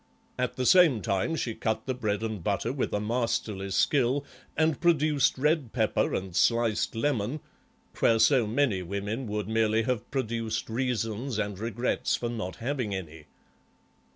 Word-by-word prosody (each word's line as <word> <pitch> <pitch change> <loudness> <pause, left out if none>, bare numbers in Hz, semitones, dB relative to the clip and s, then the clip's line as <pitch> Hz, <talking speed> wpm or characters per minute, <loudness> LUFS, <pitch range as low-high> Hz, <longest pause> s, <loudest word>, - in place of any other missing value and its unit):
At 125 - -1
the 130 - -2
same 155 - +5
time 100 - 0
she 120 -7 -2
cut 110 0 -2
the 130 - -1
bread 110 -4 -2
and 110 -5 -4
butter 105 +5 -1
with 135 - -2
a 105 - 0
masterly 110 -3 -1
skill 135 +6 +2 0.3
and 160 -2 +1
produced 150 -6 +3
red 150 -3 +1
pepper 110 -4 +1
and 95 -2 -4
sliced 115 +1 +2
lemon, 125 +1 -1 0.6
where 115 - +4
so 115 +1 +4
many 115 -4 +1
women 100 +7 -4
would 105 -1 -3
merely 110 0 +2
have 120 -2 -2
produced 115 -4 -2
reasons 120 0 -2
and 105 -3 -2
regrets 115 +2 -1
for 120 - -3
not 110 -7 -4
having 120 -3 -2
any. 80 -4 -8
115 Hz, 155 wpm, -28 LUFS, 105-130 Hz, 0.6 s, same